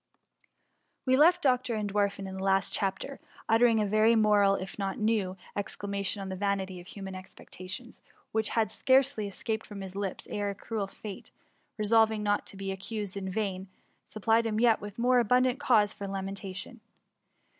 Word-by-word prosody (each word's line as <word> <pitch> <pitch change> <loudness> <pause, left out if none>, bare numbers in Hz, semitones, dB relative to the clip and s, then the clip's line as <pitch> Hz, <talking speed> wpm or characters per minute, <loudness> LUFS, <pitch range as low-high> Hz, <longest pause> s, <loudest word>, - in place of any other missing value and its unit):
We 260 -1 +4
left 345 +6 +5
Dr. 255 -3 +2
Entwerfen 205 -1 -1
in 190 0 -6
the 190 - -4
last 195 0 +2
chapter 205 +8 -2 0.3
uttering 225 0 +4
a 210 - +2
very 215 +3 +4
moral, 205 -2 +4
if 190 +2 -6
not 195 -1 -1
a - - -12
very 215 - -1
new, 200 -4 +1 0.2
excla 205 0 -5
matipn 200 0 -2
on 195 -1 -5
the 190 - -3
vanity 190 -1 -1
of 175 - -13
human 195 -1 -7
expectations; 185 +4 -9 0.3
which 220 -1 0
had 225 -1 +1
scarcely 260 -5 +2
escaped 220 +3 -3
from 205 -2 -8
his 190 -1 -8
lips, 200 -2 -3
ere 205 -1 -2
cruel 210 0 -3
Fate, 200 0 -9 0.5
resolving 220 0 +3
not 205 0 0
to 195 - -7
be 195 0 -3
accused 200 +1 -4
in 190 -1 -4
vain, 190 -1 -2 0.4
supplied 225 +2 +2
him 215 - -1
with 220 - +1
yet 230 -2 +5 0.2
more 250 +1 +4
abundant 250 +3 +3
cause 220 -8 +3
for 200 - -6
lamentation. 195 +3 -5
205 Hz, 175 wpm, -29 LUFS, 195-225 Hz, 0.5 s, left